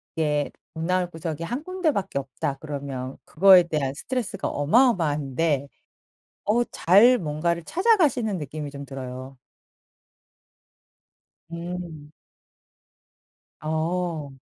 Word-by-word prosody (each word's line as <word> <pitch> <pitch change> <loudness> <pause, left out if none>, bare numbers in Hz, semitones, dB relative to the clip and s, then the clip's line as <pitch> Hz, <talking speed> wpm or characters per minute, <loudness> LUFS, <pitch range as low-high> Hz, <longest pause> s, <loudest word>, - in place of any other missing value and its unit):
이게 150 -2 0 0.2
돈 160 0 -4
나올 180 0 +1
구석이 165 -1 -5
한 245 - -4
군데밖에 315 - -1
없다 135 +1 -4
그러면 140 -3 -5
그거에 185 +1 +7
대한 150 -5 -2
스트레스가 225 - -3
어마어마한데 150 - +2 0.8
어 225 +4 +3
잘 215 +9 +6
뭔가를 170 -1 -1
찾아가시는 300 - +2
느낌이 150 -1 -6
좀 140 0 -8
들어요. 130 0 -8 2.1
음. 170 -3 -7 1.5
어. 160 -1 -2
160 Hz, 220 characters per minute, -25 LUFS, 145-195 Hz, 2.1 s, 그거에